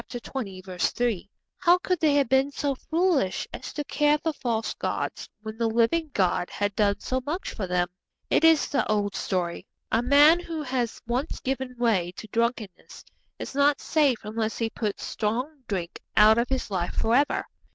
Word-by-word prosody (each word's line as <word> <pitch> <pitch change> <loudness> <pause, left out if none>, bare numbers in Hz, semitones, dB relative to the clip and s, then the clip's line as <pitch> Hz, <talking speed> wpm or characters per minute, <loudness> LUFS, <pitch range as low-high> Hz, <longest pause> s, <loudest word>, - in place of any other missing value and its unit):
3.) 200 -3 -3 0.3
How 350 0 +5
could 365 -1 -1
they 305 -3 +3
have 280 -3 +3
been 265 +3 +3
so 285 0 -1
foolish 320 - 0
as 250 - -6
to 295 - -3
care 295 +1 +2
for 320 +1 -2
false 230 -5 -2
gods - - -3
when 220 0 -7
the 230 - +2
living 235 +9 +2
God 185 -4 +1
had 205 -1 -2
done 200 -1 +2
so 260 0 -2
much 315 +7 -3
for 195 - -4
them? 180 0 +1 0.4
It - - +2
is 325 -2 +5
the 280 - +1
old 205 -1 0
story. 180 0 -2 0.2
A 225 - +3
man 290 +6 +6
who 330 -3 -5
has 250 -4 -2
once 250 +6 -2
given 260 -1 -3
way 200 -8 +1
to 220 - -9
drunkenness 230 -4 -3 0.3
is - - -6
not 285 +1 +3
safe 290 -6 +2
unless 220 +1 -2
he 225 -1 -1
puts 210 -3 -3
strong 250 +7 -2
drink 180 -4 -4 0.2
out 215 +2 +7
of 235 - 0
his 260 -5 -2
life 175 -2 -2
for 225 - +1
ever. 280 +4 +2
240 Hz, 175 wpm, -26 LUFS, 210-285 Hz, 0.4 s, out